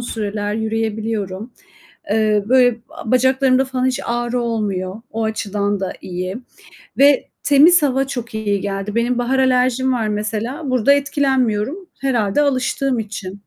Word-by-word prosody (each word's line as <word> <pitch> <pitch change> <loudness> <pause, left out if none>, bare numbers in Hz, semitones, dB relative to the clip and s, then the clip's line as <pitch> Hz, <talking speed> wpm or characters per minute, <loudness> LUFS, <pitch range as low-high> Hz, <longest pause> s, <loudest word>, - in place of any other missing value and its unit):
süreler 210 -3 -3
yürüyebiliyorum. 220 -1 -3 0.6
Eee, 215 -1 +2
böyle, 250 -2 +4 0.3
bacaklarımda 260 +2 +3
falan 260 -1 -2
hiç 260 - 0
ağrı 240 +1 -1
olmuyor. 210 -3 -3
O 225 +1 -3
açıdan 205 -2 -2
da 190 - -2
iyi 185 +2 -5 0.6
ve 280 0 +4 0.2
temiz 305 +5 +6
hava 270 -1 +1
çok 240 -4 -5
iyi 205 -2 -1
geldi. 200 +1 -4
Benim 240 +1 +1
bahar 255 +2 0
alerjim 260 0 +2
var 225 -3 -1
mesela. 220 +8 -3
Burada 255 +2 +4
etkilenmiyorum 275 - 0
herhâlde 240 -3 +1
alıştığım 265 -2 0
için. 205 -3 -6
235 Hz, 130 wpm, -19 LUFS, 210-260 Hz, 0.6 s, temiz